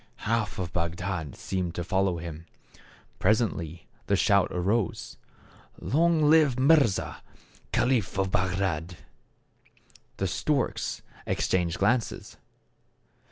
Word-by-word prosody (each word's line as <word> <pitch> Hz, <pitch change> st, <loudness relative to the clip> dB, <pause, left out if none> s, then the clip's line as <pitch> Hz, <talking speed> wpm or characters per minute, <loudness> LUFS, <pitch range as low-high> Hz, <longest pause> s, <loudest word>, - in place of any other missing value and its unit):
Half 115 Hz, -1 st, 0 dB
of 90 Hz, -2 st, -4 dB
Bagdad 85 Hz, -2 st, -3 dB
seemed 90 Hz, -3 st, -3 dB
to 85 Hz, -, -2 dB
follow 95 Hz, 0 st, +1 dB
him. 85 Hz, 0 st, -8 dB, 0.7 s
Presently 90 Hz, -6 st, 0 dB, 0.2 s
the -, -, +3 dB
shout -, -, +3 dB
arose, 95 Hz, +3 st, -1 dB, 0.3 s
" -, -, -24 dB
Long 165 Hz, +2 st, +2 dB
live 150 Hz, -5 st, +5 dB
Mirza, 135 Hz, -7 st, +3 dB, 0.5 s
caliph 120 Hz, -8 st, +1 dB
of 95 Hz, -1 st, 0 dB
Bagdad! 90 Hz, -3 st, -1 dB, 0.6 s
" -, -, -30 dB
The 95 Hz, -, -1 dB
storks 135 Hz, -, -1 dB, 0.2 s
exchanged 90 Hz, -2 st, 0 dB
glances. 115 Hz, +4 st, 0 dB
95 Hz, 105 wpm, -27 LUFS, 85-120 Hz, 0.7 s, live